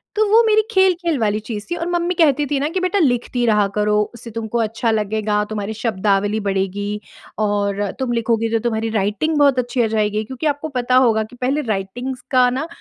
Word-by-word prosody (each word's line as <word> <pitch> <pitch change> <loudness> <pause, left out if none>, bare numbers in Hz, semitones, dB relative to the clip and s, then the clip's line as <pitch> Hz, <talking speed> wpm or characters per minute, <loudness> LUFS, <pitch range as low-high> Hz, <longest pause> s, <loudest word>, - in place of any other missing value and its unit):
तो 435 - +3
वो 455 - +7
मेरी 435 0 +5
खेल-खेल 360 -5 +2
वाली 210 -1 +1
चीज़ 215 -1 -6
थी 345 - -1
और 340 0 -3
मम्मी 350 0 0
कहती 295 -4 +3
थी 285 -1 -1
ना 285 - 0
कि, 370 - -2
"बेटा, 370 +2 0
लिखती 245 -4 +1
रहा 210 -3 +3
करो। 210 0 +2
उससे 235 -1 -10
तुमको 225 +1 -3
अच्छा 225 +1 0
लगेगा, 215 -1 0
तुम्हारी 210 0 -4
शब्दावली 205 -1 0
बढ़ेगी 200 +2 -2 0.4
और 205 -1 0 0.2
तुम 260 -2 -1
लिखोगी, 230 -1 0
तो 225 - +2
तुम्हारी 225 -1 -1
राइटिंग 210 +11 0
बहुत 280 -3 +4
अच्छी 245 0 -1
हो 225 - +2
जाएगी।" 215 -1 0
क्योंकि 260 +7 -7
आपको 300 +2 -7
पता 250 +1 +1
होगा 220 -1 +2
कि 220 +3 -13
पहले 270 +4 +1
राइटिंग्स 245 +7 -4
का 250 -1 +5
ना 265 +6 -3
230 Hz, 200 wpm, -19 LUFS, 210-275 Hz, 0.4 s, वो